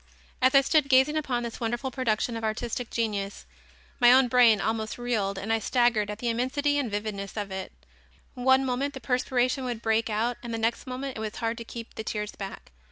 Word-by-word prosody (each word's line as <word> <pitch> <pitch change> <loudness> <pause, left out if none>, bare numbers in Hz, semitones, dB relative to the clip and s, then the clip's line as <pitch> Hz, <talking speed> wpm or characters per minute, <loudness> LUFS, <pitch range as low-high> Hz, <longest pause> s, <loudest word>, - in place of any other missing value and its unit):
As 260 +1 +4
I 275 - +9
stood 285 0 +2
gazing 265 +3 +5
upon 260 -6 -1
this 235 -1 -6
wonderful 240 +3 -2
production 235 -2 -1
of 225 - -5
artistic 225 +2 -3
genius, 205 -3 -2 0.5
my 240 - +7
own 255 0 +6
brain 235 -4 +6
almost 220 +1 -2
reeled 220 -5 -1
and 200 +3 -3
staggered 240 -3 +2
at 210 - -4
the 240 - -4
immensity 285 +5 0
and 260 -5 -1
vividness 205 -1 -4
of 205 -2 -3
it. 190 0 -5 0.6
One 265 +2 +3
moment 265 +3 -1
the - - -5
perspiration 255 0 0
would 240 -3 -4
break 225 0 +1
out 230 +3 0
and 235 - -6
the 225 - -2
next 225 +4 -1
moment 255 0 -5
it - - -5
was 215 -1 -4
hard 230 0 -2
to - - -5
keep 230 0 -9
the 220 - -6
tears 210 -1 -3
back. 195 -1 -8
235 Hz, 205 wpm, -27 LUFS, 220-255 Hz, 0.6 s, I